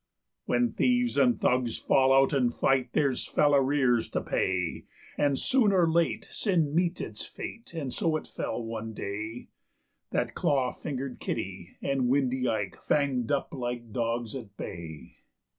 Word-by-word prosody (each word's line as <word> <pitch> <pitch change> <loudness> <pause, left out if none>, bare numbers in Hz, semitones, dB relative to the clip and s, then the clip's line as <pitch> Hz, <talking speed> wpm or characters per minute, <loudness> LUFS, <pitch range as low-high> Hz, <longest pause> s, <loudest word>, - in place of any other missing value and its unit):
When 120 -1 +2
thieves 245 -1 +2
and 245 -2 +3
thugs 125 -2 +1
fall 135 0 +3
out 135 +1 +5
and 125 -4 +2
fight 130 0 +1
there's 140 -4 +1
fell 145 -1 +3
arrears 130 -4 +3
to - - -1
pay; 90 -3 -1 0.3
And 140 -2 +2
soon 255 - +3
or 180 -3 +4
late 165 0 +1
sin 165 -8 +1
meets 175 +1 +1
its 110 -1 -5
fate, 230 -6 -8
and 140 -6 -3
so 160 -1 +1
it - - -8
fell 120 - -4
one 115 0 -5
day 105 +4 -5 0.6
That - - -1
Claw 130 -3 +1
fingered 135 -3 -5
Kitty 90 -2 -5
and 135 -2 +1
Windy 130 -1 +1
Ike 105 -4 -2
fanged 135 -5 +1
up 140 - -1
like 120 -3 -4
dogs 115 -1 -1
at 110 -7 -8
bay. 80 -2 -8
130 Hz, 155 wpm, -28 LUFS, 115-145 Hz, 0.6 s, out